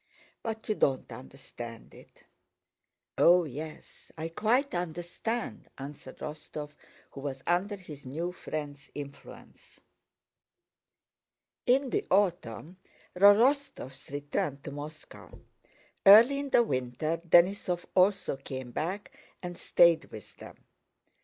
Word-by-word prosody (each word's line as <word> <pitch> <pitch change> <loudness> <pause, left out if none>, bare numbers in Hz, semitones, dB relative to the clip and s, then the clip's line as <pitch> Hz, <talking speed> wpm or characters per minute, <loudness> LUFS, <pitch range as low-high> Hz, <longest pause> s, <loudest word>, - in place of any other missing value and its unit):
But 220 -1 -5
you 215 - +2
don't 135 -9 0
understand 120 -3 -10
it." - - -17 1.0
"Oh, 175 +1 +7
yes, 155 +1 -9
I 160 +1 -4
quite 230 - +1
understand," 175 +7 -4
answered 140 -1 -9
Rostóv, 150 0 -7 0.4
who 135 - -9
was 135 -2 -5
under 185 +4 +1
his 155 -7 -11
new 160 +7 -3
friend's 145 -5 -6
influence. 140 -1 -11 1.9
In 260 +1 +3
the - - -1
autumn 180 - 0 0.4
the - - -9
Rostóvs 205 - +3
returned 145 0 -3
to - - -6
Moscow. 150 +2 -10 0.6
Early 230 +8 +8
in 280 0 -4
the 240 - +5
winter 130 - -2
Denísov 175 0 +4
also 190 -6 +3
came 130 -2 -7
back 180 +10 -4 0.3
and 175 0 -5
stayed 170 -2 +4
with 110 - -11
them. - - -13
165 Hz, 110 wpm, -30 LUFS, 140-200 Hz, 1.9 s, Early